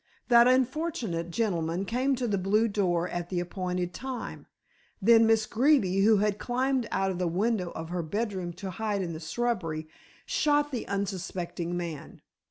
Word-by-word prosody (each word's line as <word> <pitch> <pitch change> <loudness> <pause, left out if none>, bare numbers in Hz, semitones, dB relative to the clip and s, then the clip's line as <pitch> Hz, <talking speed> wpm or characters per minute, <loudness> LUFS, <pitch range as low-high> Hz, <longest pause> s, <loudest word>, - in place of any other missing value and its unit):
That 235 0 +7
unfortunate 255 - 0
gentleman 175 -3 -1
came 255 +5 +1
to 250 -1 -2
the 200 -3 0
blue 210 +5 +2
door 180 -5 0
at 175 0 -4
the 180 - -1
appointed 180 0 -3
time, 260 -1 -6 0.5
then 225 +2 +6
Miss 225 -1 +3
Greeby, 225 -7 +3
who 215 0 +6
had 210 0 +1
climbed 255 -1 0
out 195 0 0
of 180 - -5
the 180 - +1
window 190 +1 0
of 160 0 -6
her 180 0 -2
bedroom 190 0 -3
to 190 +2 -6
hide 205 0 -2
in 170 -2 -4
the 160 - -6
shrubbery, 165 -4 -2 0.4
shot 295 -6 +2
the 245 -4 -4
unsuspecting 185 -3 -3
man. 165 -4 -6
200 Hz, 165 wpm, -28 LUFS, 175-235 Hz, 0.5 s, That